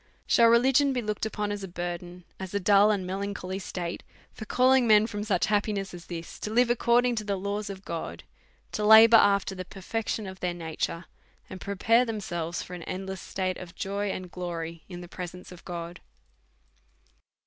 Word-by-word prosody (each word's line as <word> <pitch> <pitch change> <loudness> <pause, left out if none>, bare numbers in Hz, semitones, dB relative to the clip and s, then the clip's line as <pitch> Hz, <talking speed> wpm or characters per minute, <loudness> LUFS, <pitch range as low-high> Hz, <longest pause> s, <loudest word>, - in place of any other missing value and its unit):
Siiall 230 -1 +6
religion 265 +4 +4
be 250 - -1
looked 210 0 -2
upon 210 -1 -3
as 205 -1 -4
a - - -4
burden, 175 0 -6 0.2
as 190 +1 -6
a - - +2
dull 200 +2 +5
and 200 -3 0
melancholy 190 0 -4
state, 175 -2 -5 0.3
for 220 - -8
calling 255 +2 +4
men 215 -1 +6
from 205 -2 -4
such 200 -5 +1
hap 210 -1 +2
piness 200 -3 -3
as 175 -1 -10
this, 170 -1 -7
to - - -4
live 240 +2 +3
according 240 +1 +3
to 215 -2 -2
the 200 -1 -1
laws 200 +2 -3
of 195 -1 -8
God, 165 -1 -5 0.5
to 210 - -2
labour 220 +2 +9
after 200 -2 +3
the 185 -1 -5
perfection 210 +3 -4
of 190 0 -8
their 180 -1 -2
nature, 165 +1 -4 0.5
and 185 - -8
pre 200 0 -4
pai'e 230 +5 +4
themselves 175 -6 -3
for 180 - -10
an 175 - -6
endless 190 0 -5
state 185 -1 -3
of 180 -2 -10
joy 200 +1 -2
and 185 -2 -5
glory 170 -2 -5
in 175 -1 -7
the 175 - -9
presence 180 +1 -8
of 180 - -12
God 170 0 -6
195 Hz, 190 wpm, -27 LUFS, 180-215 Hz, 0.5 s, labour